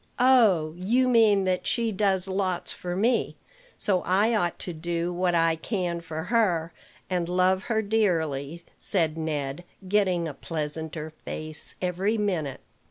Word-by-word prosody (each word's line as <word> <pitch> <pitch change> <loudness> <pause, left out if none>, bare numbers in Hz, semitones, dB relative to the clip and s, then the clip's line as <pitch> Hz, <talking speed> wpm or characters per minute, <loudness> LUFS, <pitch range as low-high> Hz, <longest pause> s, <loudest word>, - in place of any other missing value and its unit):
"Oh! 220 -12 +4
you 235 +8 +2
mean 220 -5 +4
that 185 -1 -1
she 230 -2 +1
does 195 -2 +1
lots 190 -2 -1
for 175 0 -5
me; 230 +5 +1 0.4
so 190 -4 +1
I 205 +5 +2
ought 175 -6 0
to 175 - -5
do 170 +2 -2
what 175 0 +1
I 165 -1 +3
can 175 -1 -3
for 160 -1 -5
her, 180 -6 +1 0.3
and 175 -2 -1
love 185 +1 +2
her 220 -2 0
dearly," 170 -8 0 0.2
said 165 -5 +2
Ned, 150 -1 -3 0.2
getting 185 -4 +1
a 150 - -5
pleasanter 155 +1 -4
face 155 0 -2
every 190 +5 0
minute. 175 -10 -2
180 Hz, 145 wpm, -26 LUFS, 165-205 Hz, 0.4 s, Oh